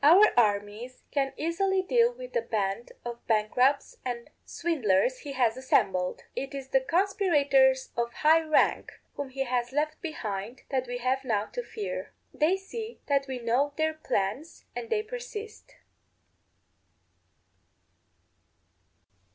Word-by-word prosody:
Our 360 +9 +7
armies 215 +2 0
can 275 -2 +1
easily 375 +4 +1
deal 470 +4 +4
with - - -10
the 480 - +2
band 205 - -2
of 240 0 -6
bankrupts 245 +6 +2
and 240 -2 -5
swindlers 255 - +1
he 285 - -7
has 240 -4 +2
assembled; 190 -8 +1
it 275 +1 -4
is 270 -1 -6
the 265 - +3
conspirators 285 -6 +3
of 235 0 -1
high 315 +6 +4
rank, 310 -1 +2 0.2
whom 285 -2 -5
he 270 +1 -2
has 245 -1 -1
left 305 +2 -1
behind, 230 - -5
that 260 -2 0
we 245 0 -3
have 255 +2 0
now 215 -5 0
to - - -2
fear. 435 -3 -5 0.2
They 325 +5 +2
see 440 +4 -7
that 280 -1 +1
we 260 -1 -3
know 250 +5 +1
their 315 0 +1
plans, 270 0 -3
yet 460 - -5
they 435 -2 +1
persist. 445 -2 -8
270 Hz, 135 wpm, -28 LUFS, 240-335 Hz, 0.2 s, Our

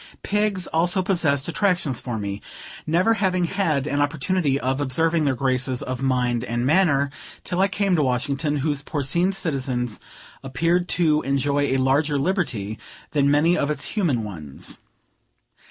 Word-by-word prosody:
Pigs 205 -3 0
also 175 +3 +1
possessed 160 -7 +1
attractions 175 - 0
for 120 -3 -4
me, 100 -1 -4 0.5
never 180 +8 +3
having 185 -4 +1
had 165 -6 0
an 145 -1 0
opportunity 145 0 0
of 130 +2 -1
observing 160 +4 +1
their 135 -2 +1
graces 130 0 -1
of 130 0 -4
mind 125 -3 +1
and 120 0 -2
manner, 145 -3 +3 0.3
till 180 0 -3
I 195 - +4
came 195 -1 +1
to 155 - +2
Washington, 140 +3 0
whose 145 -3 0
porcine 155 +6 0
citizens 130 - -2 0.4
appeared 165 +7 0
to 155 -3 +3
enjoy 140 +1 +1
a 135 -1 +1
larger 140 +3 +2
liberty 135 - -1 0.3
than 140 -2 +2
many 155 +4 +4
of 145 - 0
its 150 -2 -2
human 155 - +1
ones. 80 -9 -7
145 Hz, 150 wpm, -23 LUFS, 130-175 Hz, 0.5 s, I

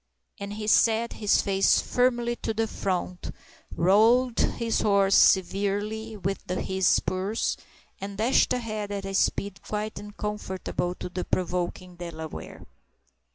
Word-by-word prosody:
And 200 0 -5
he 215 0 -5
set 225 +2 +3
his 210 -2 +2
face 195 -1 +3
firmly 240 -1 +1
to 220 - -3
the 225 +1 +1
front, 185 -4 -3 0.5
roweled 225 +7 +4 0.2
the 230 -1 -3
horse 200 -2 +3
severely 205 +3 +2
with 195 -1 -4
his 190 0 0
spurs, 190 +4 +1 0.4
and 200 0 -6
dashed 230 +5 +3
ahead 215 -4 -2
at 200 -1 -4
a 195 - -5
speed 200 0 0
quite 215 0 -4
uncomfortable 205 -3 -4
to - - -6
the 180 0 -4
provoking 180 0 -3
Delaware. 160 -2 -8
200 Hz, 125 wpm, -26 LUFS, 185-220 Hz, 0.5 s, roweled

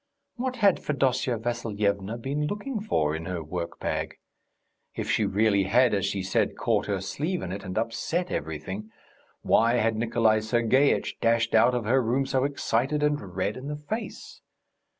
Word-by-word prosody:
What 255 +1 -2
had 205 -6 +3
Fedosya 130 -4 0
Vassilyevna 110 -3 -1
been 140 +5 -2
looking 210 - -3
for 80 - 0
in 80 +1 -5
her 90 -2 -4
work 85 +2 -5
bag? - - -2 0.8
If - - -2
she - - +2
really 100 -1 +2
had, 120 +5 +4
as 100 -1 +1
she 100 -1 -2
said, 95 - 0
caught - - +1
her 100 -2 -1
sleeve 155 - -3
in 90 - -4
it 100 +2 -5
and 95 +1 -5
upset 120 +10 -1
everything, 80 +8 -4 0.5
why 115 +2 +4
had 115 -2 +2
Nikolay 115 -1 +2
Sergeitch 120 +5 +2
dashed 115 0 +2
out 120 +3 +5
of 120 -3 -2
her 130 +4 +3
room 125 +4 +1
so 130 0 +1
excited 140 +1 0
and 145 -12 -1
red 100 +3 -1
in 130 +2 -7
the 150 - -3
face? 215 +10 -6
115 Hz, 170 wpm, -27 LUFS, 100-140 Hz, 0.8 s, out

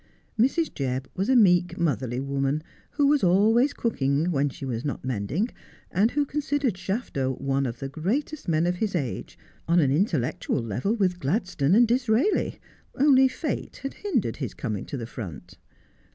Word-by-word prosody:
Mrs. 275 +8 +1
Jebb 130 -1 -2
was 195 +5 -1
a 265 - +4
meek, 180 -6 +4
motherly 130 - -1
woman, 140 +2 -1 0.3
who 290 - +1
was 290 -2 +3
always 220 +9 +4
cooking 155 - 0
when 145 -2 +1
she 135 - -8
was 120 -2 -3
not 140 -3 -4
mending, 130 - -1 0.4
and 205 +5 +3
who 290 +3 0
considered 290 -3 -1
Shafto 180 - -3
one 135 0 0
of 120 0 -5
the 135 - -5
greatest 220 - -3
men 165 0 +2
of 180 0 0
his 205 -1 -1
age, 140 -8 -3 0.3
on 170 +1 +4
an 140 -5 +3
intellectual 145 - 0
level 120 - -1
with 185 -5 0
Gladstone 180 - +1
and 235 +1 +6
Disraeli, 245 - +1 0.4
only 265 -1 +5
Fate 280 +3 -4
had 275 - -3
hindered 255 - -1
his 130 -8 -5
coming 105 -6 -4
to 140 - -5
the 115 - -5
front. 105 -9 -9
175 Hz, 165 wpm, -26 LUFS, -, 0.4 s, and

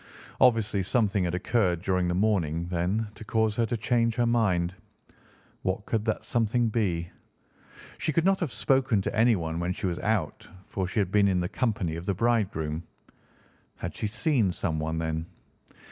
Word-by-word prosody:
Obviously 115 -5 +3
something 100 -2 +1
had 90 0 -1
occurred 90 -3 +1
during 90 -2 +1
the 90 - 0
morning, 90 -5 +1
then, 90 +5 0
to 110 - -11
cause 110 0 +1
her 115 -1 +2
to 120 - -1
change 115 +1 +1
her 120 -1 +2
mind. 95 -7 +1 0.9
What 95 +2 -2
could 110 -2 -1
that 110 - -1
something 120 0 +1
be? 90 -7 -1 0.9
She - - 0
could 165 +3 +1
not 195 0 +3
have 165 -8 -2
spoken 130 -7 +2
to - - -3
anyone 95 -8 +2
when 90 +1 -1
she - - -5
was 90 -2 -1
out, 105 -8 -1 0.2
for 95 -2 -3
she 95 - -6
had 95 -3 0
been 100 -1 +4
in 95 -2 +2
the 90 - -1
company 100 -9 -1
of 85 - -8
the 100 - +1
bridegroom. 95 -9 0 0.9
Had - - -6
she 105 - -2
seen 115 - +1
someone, 80 -3 -2
then? 80 0 -2
100 Hz, 175 wpm, -27 LUFS, 90-115 Hz, 0.9 s, been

